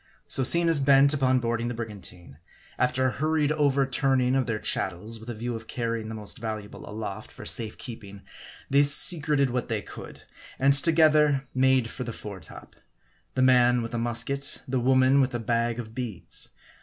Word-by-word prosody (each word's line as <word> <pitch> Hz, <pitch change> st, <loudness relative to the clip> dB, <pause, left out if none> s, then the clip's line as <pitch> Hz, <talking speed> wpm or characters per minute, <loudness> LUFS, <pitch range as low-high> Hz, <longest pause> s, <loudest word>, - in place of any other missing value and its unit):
So 135 Hz, -, +1 dB
seeing 170 Hz, +6 st, +2 dB
us 165 Hz, -3 st, +4 dB
bent 140 Hz, +1 st, +5 dB
upon 130 Hz, -2 st, +2 dB
boarding 115 Hz, 0 st, -2 dB
the 120 Hz, -, -4 dB
brigantine; 95 Hz, -9 st, -9 dB, 0.4 s
after 130 Hz, +1 st, +1 dB
a 130 Hz, -, +2 dB
hurried 155 Hz, +1 st, 0 dB
over 140 Hz, -3 st, +2 dB
turning 130 Hz, -1 st, +1 dB
of 135 Hz, -1 st, 0 dB
their 115 Hz, -2 st, -1 dB
chattels, 105 Hz, +3 st, -2 dB
with 110 Hz, +2 st, -11 dB
a 120 Hz, -, -5 dB
view 120 Hz, +2 st, -4 dB
of 110 Hz, 0 st, -9 dB
carrying 115 Hz, -2 st, -3 dB
the 110 Hz, -, -6 dB
most 105 Hz, -2 st, -8 dB
valuable 110 Hz, -2 st, -7 dB
aloft 110 Hz, -1 st, -7 dB
for -, -, -11 dB
safe 110 Hz, -2 st, +2 dB
keeping, 100 Hz, -5 st, -10 dB, 0.4 s
they 140 Hz, +1 st, +4 dB
secreted 145 Hz, -1 st, +4 dB
what 125 Hz, 0 st, -2 dB
they 110 Hz, -3 st, -3 dB
could; -, -, -11 dB, 0.3 s
and 140 Hz, +1 st, +4 dB
together 150 Hz, -2 st, +3 dB
made 130 Hz, -2 st, +2 dB
for -, -, -6 dB
the 115 Hz, -2 st, -6 dB
fore 100 Hz, -3 st, -8 dB
top; 80 Hz, -, -12 dB, 0.6 s
the 130 Hz, -, +2 dB
man 125 Hz, -1 st, +4 dB
with 115 Hz, -, -7 dB
a 120 Hz, -, -1 dB
musket, 120 Hz, +4 st, -2 dB
the 130 Hz, 0 st, -1 dB
woman 130 Hz, +2 st, +4 dB
with 130 Hz, -2 st, -1 dB
a -, -, -2 dB
bag 115 Hz, 0 st, -1 dB
of 110 Hz, -2 st, -7 dB
beads. 120 Hz, -6 st, -4 dB
125 Hz, 185 wpm, -26 LUFS, 115-135 Hz, 0.6 s, bent